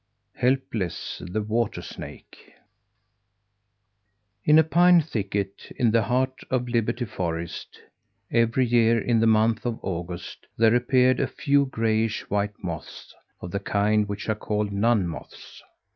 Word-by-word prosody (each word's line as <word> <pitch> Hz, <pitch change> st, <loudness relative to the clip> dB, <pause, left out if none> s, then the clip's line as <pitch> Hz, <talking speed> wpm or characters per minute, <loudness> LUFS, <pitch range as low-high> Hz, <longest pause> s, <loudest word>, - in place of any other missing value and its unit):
HELPLESS, 125 Hz, -8 st, -2 dB
THE 105 Hz, +4 st, -2 dB
WATER 115 Hz, +1 st, -1 dB
SNAKE -, -, -11 dB, 1.9 s
In 150 Hz, +1 st, +5 dB
a 160 Hz, -, +7 dB
pine 175 Hz, +2 st, +5 dB
thicket 100 Hz, -8 st, -4 dB
in 120 Hz, -3 st, +2 dB
the 115 Hz, +1 st, +3 dB
heart 130 Hz, +4 st, 0 dB
of 125 Hz, -1 st, 0 dB
Liberty 120 Hz, +1 st, -1 dB
Forest, 85 Hz, -4 st, -5 dB, 0.5 s
every 115 Hz, +2 st, +2 dB
year, 115 Hz, -1 st, +3 dB
in 115 Hz, +1 st, +1 dB
the 115 Hz, -, +3 dB
month 110 Hz, 0 st, +3 dB
of 120 Hz, -2 st, -2 dB
August, 85 Hz, -1 st, -6 dB
there 115 Hz, 0 st, +4 dB
appeared 125 Hz, +1 st, +3 dB
a -, -, +1 dB
few 140 Hz, -2 st, +1 dB
grayish 110 Hz, -2 st, -1 dB
white 100 Hz, 0 st, -2 dB
moths 85 Hz, -3 st, -7 dB, 0.3 s
of 90 Hz, -, -7 dB
the 100 Hz, -, -2 dB
kind 105 Hz, +1 st, +1 dB
which 100 Hz, 0 st, -5 dB
are 110 Hz, -, +2 dB
called 105 Hz, -1 st, -2 dB
nun 100 Hz, -1 st, +2 dB
moths. 80 Hz, -5 st, -10 dB
110 Hz, 135 wpm, -25 LUFS, 100-120 Hz, 1.9 s, a